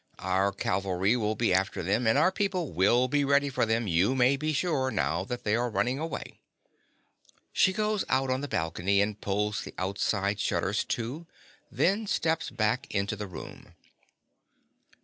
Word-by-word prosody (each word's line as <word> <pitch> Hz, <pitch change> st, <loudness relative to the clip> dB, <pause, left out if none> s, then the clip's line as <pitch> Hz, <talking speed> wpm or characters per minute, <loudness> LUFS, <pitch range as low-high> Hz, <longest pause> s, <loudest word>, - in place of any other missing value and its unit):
Our 95 Hz, +2 st, +1 dB
cavalry 95 Hz, +2 st, 0 dB
will 110 Hz, -2 st, 0 dB
be 115 Hz, -5 st, +1 dB
after 95 Hz, 0 st, 0 dB
them; 105 Hz, +7 st, +1 dB
and 110 Hz, -, +4 dB
our 160 Hz, +6 st, +4 dB
people 190 Hz, -5 st, -1 dB
will 110 Hz, +9 st, +3 dB
be 145 Hz, +2 st, +1 dB
ready 140 Hz, +1 st, +3 dB
for 125 Hz, -, 0 dB
them 115 Hz, +1 st, +1 dB
you 95 Hz, +7 st, +2 dB
may 130 Hz, +1 st, +4 dB
be 155 Hz, +3 st, -2 dB
sure, 145 Hz, -4 st, 0 dB
now 80 Hz, -, 0 dB
that 125 Hz, +3 st, -5 dB
they 105 Hz, 0 st, +1 dB
are 120 Hz, +1 st, 0 dB
running 125 Hz, +4 st, 0 dB
away. 160 Hz, +1 st, -6 dB, 1.1 s
(_She 190 Hz, -, +4 dB
goes 210 Hz, +1 st, 0 dB
out 130 Hz, 0 st, +1 dB
on 130 Hz, +1 st, 0 dB
the 145 Hz, -, -4 dB
balcony 90 Hz, -, 0 dB
and 105 Hz, +1 st, 0 dB
pulls 105 Hz, +1 st, -1 dB
the -, -, -9 dB
outside 100 Hz, +2 st, -1 dB
shutters 95 Hz, +4 st, 0 dB
to; 130 Hz, +9 st, -4 dB, 0.4 s
then 205 Hz, +4 st, +1 dB
steps 160 Hz, -3 st, 0 dB
back 110 Hz, +3 st, -1 dB
into 100 Hz, +1 st, -1 dB
the 105 Hz, 0 st, -6 dB
room. 90 Hz, -, -11 dB
115 Hz, 170 wpm, -28 LUFS, 100-140 Hz, 1.1 s, and